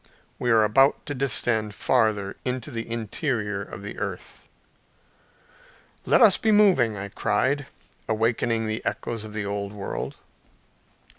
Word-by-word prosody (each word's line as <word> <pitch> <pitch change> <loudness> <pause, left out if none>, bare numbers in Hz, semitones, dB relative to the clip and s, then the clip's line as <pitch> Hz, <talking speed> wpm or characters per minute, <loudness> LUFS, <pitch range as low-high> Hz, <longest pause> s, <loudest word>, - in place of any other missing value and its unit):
We 125 - +1
were 110 -1 +5
about 135 +7 +3
to 145 - -4
descend 115 -5 +1
farther 110 -6 +1
into 125 -2 -3
the 115 0 -5
interior 110 -2 -2
of 100 - -9
the 105 - -7
earth. - - -6 1.6
"Let - - +4
us 215 -5 +7
be 220 - +1
moving," 180 - +4
I 100 +1 -5
cried, 130 +8 0 0.4
awakening 115 +1 0
the 110 0 -3
echoes 115 -2 -3
of 105 - -10
the 105 -1 -3
old 100 0 -4
world. 100 -2 -5
115 Hz, 135 wpm, -25 LUFS, 105-130 Hz, 1.6 s, us